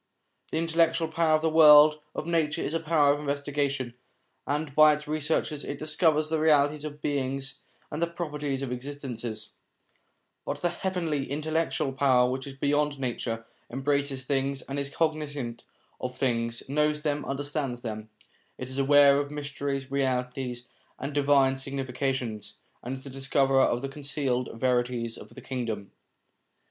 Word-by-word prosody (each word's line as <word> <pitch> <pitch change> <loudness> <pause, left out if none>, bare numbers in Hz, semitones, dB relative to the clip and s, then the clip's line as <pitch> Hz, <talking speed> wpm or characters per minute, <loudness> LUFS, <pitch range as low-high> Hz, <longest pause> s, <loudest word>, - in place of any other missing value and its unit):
The - - -1
intellectual 165 0 +2
power 160 -1 +3
of 155 - -1
the 160 - +3
world 150 -1 +8 0.2
of - - -3
nature 165 -3 0
is 150 - -3
a 165 - +1
power 155 -3 +3
of 145 - -3
investigation, 140 -3 -2 0.5
and 145 0 -2
by 155 +1 +7
its 150 0 -10
researches 150 -1 -1
it 140 - -5
discovers 155 0 +1
the 160 0 0
realities 150 -1 +3
of 150 -1 -7
beings, 135 -1 -2 0.3
and 150 - -4
the 170 - +2
properties 150 -5 -3
of 130 - -4
existences; 125 -5 -6 0.9
but - - -4
the 175 - +2
heavenly 170 -7 -2
intellectual 155 -1 -1
power 130 -2 +4
which 130 +2 -3
is 135 - -8
beyond 145 +1 0
nature, 115 -3 -3 0.2
embraces 140 +1 -1
things 135 -1 -1
and 140 +1 -4
is 140 0 -3
cog 160 +2 +1
nisant 145 -6 -5 0.4
of 125 0 -5
things, 115 -3 -1
knows 150 +2 +1
them, 145 -1 0
understands 140 -2 -3
them, 110 -2 -5 0.5
is 130 +1 -5
aware 140 0 +6
of 145 0 -2
mysteries, 140 -2 -4
realities, 125 -2 -1 0.3
and 140 +2 -5
divine 140 -2 +3
significations, 130 -4 -3 0.3
and 130 +2 -4
is 130 - -12
the 140 - -8
discoverer 135 0 +2
of 120 -1 +2
the - - -1
concealed 135 -3 -2
verities 120 -1 0
of - - -11
the - - -9
Kingdom. 115 -6 -4
140 Hz, 155 wpm, -27 LUFS, 130-150 Hz, 0.9 s, world